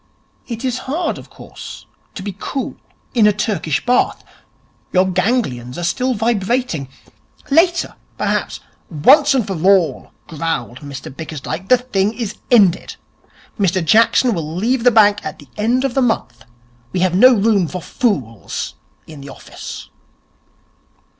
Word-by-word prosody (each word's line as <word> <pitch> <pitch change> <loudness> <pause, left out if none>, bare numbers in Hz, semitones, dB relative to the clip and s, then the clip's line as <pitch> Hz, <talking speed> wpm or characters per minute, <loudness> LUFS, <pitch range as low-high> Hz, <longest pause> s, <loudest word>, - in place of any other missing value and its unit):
It 230 +1 -5
is 250 -1 -1
hard, 325 +4 -1
of - - -14
course, - - -11 0.3
to 190 - -6
be 200 -2 -5
cool 270 - -4 0.4
in 225 -4 +5
a - - +6
Turkish 205 -7 -2
Bath. 250 0 +1 0.7
Your 185 +1 +3
ganglions 180 - -1
are 175 - -4
still 250 +9 0
vibrating. 225 - -1 0.6
Later, 345 +4 +3 0.2
perhaps - - -2 0.2
' - - -39
'Once 270 - +5
and 245 -5 +1
for 195 - -3
all,' 185 -8 +2 0.2
growled 150 -6 -3
Mr 140 -2 -9
Bickersdyke, 160 +4 -6
'the 255 - +7
thing 215 -4 -1
is 230 -5 -4
ended. 195 -7 +3 0.6
Mr 185 -3 +1
Jackson 230 +5 +4
will 160 -3 -4
leave 230 +6 0
the 245 - +7
bank 210 -3 +4
at - - -6
the - - -15
end 235 +5 +1
of 270 - -1
the 270 - +1
month. 120 - -1 0.5
We 185 - 0
have 185 -1 +2
no 250 +7 +7
room 200 -4 +2
for 180 - -5
fools 140 - -2 0.3
in 155 -3 -11
the 140 - -10
office.' - - -9
200 Hz, 145 wpm, -18 LUFS, 165-245 Hz, 0.7 s, the